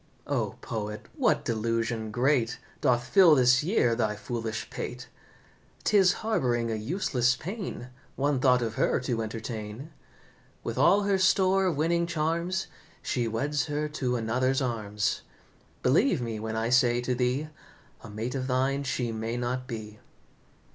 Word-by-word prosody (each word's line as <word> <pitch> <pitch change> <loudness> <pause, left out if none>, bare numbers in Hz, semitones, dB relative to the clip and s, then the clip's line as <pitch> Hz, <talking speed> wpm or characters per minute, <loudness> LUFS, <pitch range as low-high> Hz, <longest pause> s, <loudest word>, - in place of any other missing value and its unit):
"O, - - -1
poet, 105 -1 -5
what - - +1
delusion 115 0 -1
great 125 +1 +1 0.2
Doth 120 -1 +2
fill 170 +4 +6
this 125 +1 +5
year 155 - +2
thy 110 -2 0
foolish 110 +1 -4
pate? - - -6 0.8
'Tis 195 -4 +5
harbouring 120 - +1
a - - -1
useless 125 - +1
pain 185 - -6 0.3
One 140 0 +1
thought 125 -2 +4
of 110 -1 -2
her - - +2
to 120 -3 -1
entertain. 110 +4 -6 0.7
With - - -3
all 200 +3 +5
her 200 -1 +2
store 190 0 +3
of 165 -6 -1
winning 170 +2 +1
charms, 170 +3 -1 0.4
She 120 -3 -1
weds 145 +8 -1
her 150 0 -1
to 130 -5 -1
another's 125 +3 +1
arms. 110 -5 -1 0.6
Believe 160 - +3
me, 115 -3 -4
when 110 +1 -4
I 110 +1 0
say 120 -1 +4
to 125 +1 -1
thee 125 +5 0 0.5
A 115 - -9
mate 110 +4 -4
of 130 -1 -3
thine 135 +2 +1
she 130 -3 -2
may 115 +1 -3
not 125 +1 -2
be." 110 -3 -7
125 Hz, 150 wpm, -28 LUFS, 115-150 Hz, 0.8 s, fill